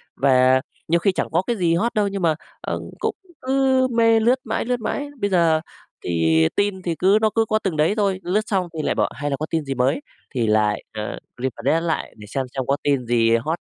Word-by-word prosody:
Và 130 -1 +4 0.3
nhiều 170 +1 +3
khi 195 - +2
chẳng - - -2
có 170 - +2
cái 240 - +1
gì 170 -3 +2
hot 230 +8 0
đâu 210 -1 +1
nhưng 200 -1 -4
mà, 160 -3 +2 0.3
ờ, - - -3 0.2
cũng - - -1 0.3
cứ 265 0 +2
mê, 230 -1 +4
lướt 240 +4 +3
mãi, - - -2
lướt 250 0 -1
mãi. 285 +5 -3
Bây 205 -2 0
giờ 165 -4 +3 0.4
thì 80 -1 +3
tin 200 -2 0
thì 170 -2 -2
cứ 195 +3 +5
nó 220 - +4
cứ 225 - +3
có 215 0 +1
từng 180 -6 -1
đấy 155 +6 +3
thôi, 195 -3 +1
lướt 185 +5 +1
xong 190 -4 0
thì 160 - -3
lại - - -1
bảo: - - +1
"Hay 145 0 -3
là 140 - -1
có 155 - -3
tin 160 -2 -1
gì 135 - -2
mới?" 130 +4 +1 0.3
thì 115 -3 +1
lại, 105 -1 +2
ờ, 105 -1 -5 0.2
refresh 130 +5 0
lại 165 -1 -2
để 105 - -11
xem 130 +5 -2
xem 135 - -1
có 140 - +2
tin 140 -3 +1
gì 115 -1 +3
hot, 155 +9 -1
165 Hz, 235 wpm, -22 LUFS, 130-205 Hz, 0.4 s, cứ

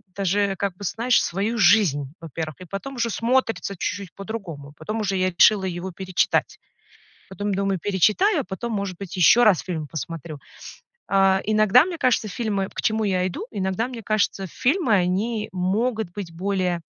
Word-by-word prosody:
даже, 200 +1 0
как 200 -1 -2
бы, 200 - -11
знаешь, 230 +6 +2
свою 205 +6 -2
жизнь, 175 -9 +4
во-первых, 160 -2 -6
и - - -8
потом 195 +10 -6
уже 235 -1 0
смотрится 230 -4 0
чуть-чуть 185 +1 -4
по-другому. 185 -9 -7
Потом 220 +1 -4
уже 200 -2 -1
я 185 0 +2
решила 190 +3 +4
его 180 +1 -4
перечитать. 185 0 0 0.7
Потом 205 +2 -3
думаю: 195 0 0
"Перечитаю, 215 - +2
а - - -7
потом, 200 +5 -5
может 200 -3 -3
быть, 195 -1 -7
ещё 220 +7 +6
раз 210 -7 +5
фильм 160 -5 -4
посмотрю". 160 +1 -6 0.7
Э, 195 -1 +4
иногда, 215 +4 +5
мне 360 - -4
кажется, 235 -3 +1
фильмы 200 -2 -2
к - - -5
чему 220 0 +1
я 185 -2 +1
иду, 185 - -5
иногда, 195 +3 -2
мне 240 -3 -8
кажется, 200 -2 0
фильмы, 260 - +1
они 205 +4 0
могут 210 +3 -1
быть 190 -4 -7
более, 180 0 -1
195 Hz, 165 wpm, -23 LUFS, 180-220 Hz, 0.7 s, ещё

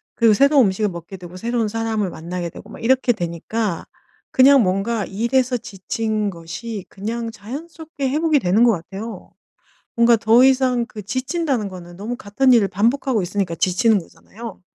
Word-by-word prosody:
그리고 230 -2 +4
새로운 275 0 +5
음식을 205 +2 0
먹게 170 +2 -9
되고 175 0 -11
새로운 230 +1 -1
사람을 220 -3 -1
만나게 170 +1 -5
되고 205 - -13
막 - - -11
이렇게 255 +1 +3
되니까 175 +1 -3 0.5
그냥 270 0 +6
뭔가 195 +4 0
일에서 245 +5 0
지친 215 +1 -3
것이 190 +5 -7
그냥 225 +3 -4
자연스럽게 285 +6 -6
회복이 310 +1 +2
되는 200 +1 +3
것 240 - +6
같아요. 195 +6 -7 0.6
뭔가 235 0 +6
더 230 +3 +5
이상 255 -2 +2
그 210 - -9
지친다는 260 - -1
거는 175 -2 -11
너무 220 +5 -4
같은 255 +5 +2
일을 210 -5 +4
반복하고 230 +4 +1
있으니까 185 -1 -2
지치는 190 +5 +2
거잖아요. 210 +4 -11
225 Hz, 370 characters per minute, -21 LUFS, 190-250 Hz, 0.6 s, 그냥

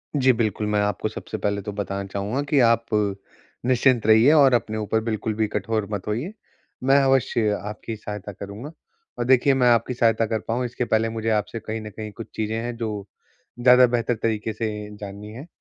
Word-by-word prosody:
जी, 130 -2 +4
बिल्कुल, 110 -2 -1
मैं 105 0 +1
आपको 105 -1 -1
सबसे - - -6
पहले 100 0 -1
तो 105 +1 -5
बताना 100 -1 -3
चाहूँगा 100 +8 -2
कि 145 - +3
आप 115 0 +2 0.8
निश्चिंत 125 -2 +3
रहिए 110 +6 +6
और 140 -4 +6
अपने 110 -2 0
ऊपर 110 +1 0
बिल्कुल 110 -1 -2
भी 110 -1 +1
कठोर 105 0 -2
मत 100 0 -4
होइए, 125 - -3 0.5
मैं 135 +2 +5
अवश्य 125 -4 +2
आपकी 105 +2 -6
सहायता 105 -1 -7
करूँगा। 100 - -8 0.5
और 120 - 0
देखिए, 130 +2 +4
मैं 125 -2 +3
आपकी 120 +2 +2
सहायता 115 -1 +2
कर 110 0 -1
पाऊँ, 120 +2 -1
इसके 120 0 -3
पहले 115 0 +1
मुझे 115 0 -3
आपसे 110 +1 -1
कहीं 110 +1 -5
न 110 - -7
कहीं 110 +1 -7
कुछ 115 +2 -9
चीज़ें 110 0 -2
हैं 120 +1 -3
जो 105 -3 -4 0.5
ज़्यादा 125 +1 +7
बेहतर 120 0 0
तरीके 110 -1 -1
से 110 0 -2 0.3
जाननी 105 +1 -8
हैं। 135 +8 -9
110 Hz, 190 wpm, -23 LUFS, 105-120 Hz, 0.8 s, ज़्यादा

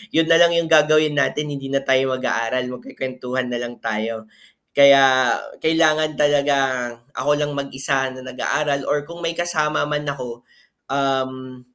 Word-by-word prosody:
Yun 165 0 +3
nalang 170 +1 +5
yung 165 - -2
gagawin 155 -1 +4
natin, 150 +1 0
hindi 135 0 -7
na 140 - +1
tayo 130 0 +1
mag-aaral 125 0 -2
magkukwentuhan 130 - -5
nalang 120 0 -5
tayo. 110 0 -4 0.5
Kaya 135 -3 +6 0.3
kailangan 155 -2 +2
talaga, 145 -1 +2 0.6
ako 135 +5 0
lang 145 0 -1
mag-isa 135 -1 -1
na 130 - -10
nag-aaral 140 +2 -2
or 145 +1 -2
kung 170 0 -10
may 165 - 0
kasama 155 -4 0
man 150 0 -2
ako, 125 -3 -8 0.5
um, 130 -2 -2
140 Hz, 140 wpm, -20 LUFS, 130-150 Hz, 0.6 s, Kaya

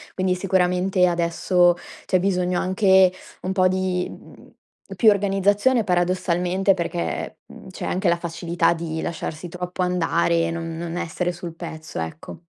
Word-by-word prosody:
Quindi 185 -1 +1
sicuramente 180 0 +2
adesso 175 +1 +2 0.3
c'è 185 - +3
bisogno 180 -1 0
anche 190 0 +4 0.3
un 185 - -2
po' 185 -1 +3
di, 185 -1 -1
mhmm, - - -14 0.4
più 220 -3 +6
organizzazione 205 +4 +2
paradossalmente 180 +1 +1
perché, 125 - -4
mhmm, - - -14
c'è 185 - -7
anche 185 0 0
la 170 - +2
facilità 170 0 0
di 160 -1 -4
lasciarsi 165 0 -5
troppo 180 +1 -4
andare, 170 -1 +1
non 165 0 -4
non 170 0 -4
essere 175 +1 -2
sul 175 -1 -7
pezzo, 160 - -7
ecco. 80 - -7
180 Hz, 140 wpm, -23 LUFS, 170-185 Hz, 0.4 s, più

